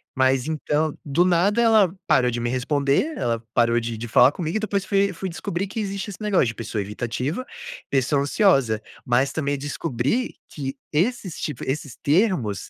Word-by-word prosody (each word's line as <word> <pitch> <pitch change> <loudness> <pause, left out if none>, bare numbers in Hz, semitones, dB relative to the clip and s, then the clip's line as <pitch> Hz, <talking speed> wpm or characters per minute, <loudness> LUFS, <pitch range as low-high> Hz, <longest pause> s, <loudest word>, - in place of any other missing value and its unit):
Mas 130 +1 +2
então, 155 0 -1
do 150 +5 +3
nada 185 +6 +3
ela 215 -5 +4
parou 130 -6 +3
de 120 0 -2
me 120 - -1
responder, 140 - +1
ela 115 -1 -1
parou 120 0 +3
de 115 -1 -4
de 120 +2 -5
falar 125 +4 +6
comigo 170 +3 -2
e - - -1
depois 200 -2 -1
fui 200 0 +1
fui 190 +2 -4
descobrir 175 +2 -3
que 200 - -5
existe 200 0 -3
esse 200 - -9
negócio, 200 - +2
de 115 - -4
pessoa 110 -2 -3
evitativa, 125 - -3 0.4
pessoa 140 +1 +2
ansiosa. 135 - +3 0.2
Mas 125 +3 +2
também 145 -2 -1
descobri 145 - -2
que 135 -2 -5 0.2
esses 185 +2 -1
tipo 145 -6 -4
esses 135 -2 -3
termos, 145 - +1
145 Hz, 175 wpm, -23 LUFS, 125-195 Hz, 0.4 s, falar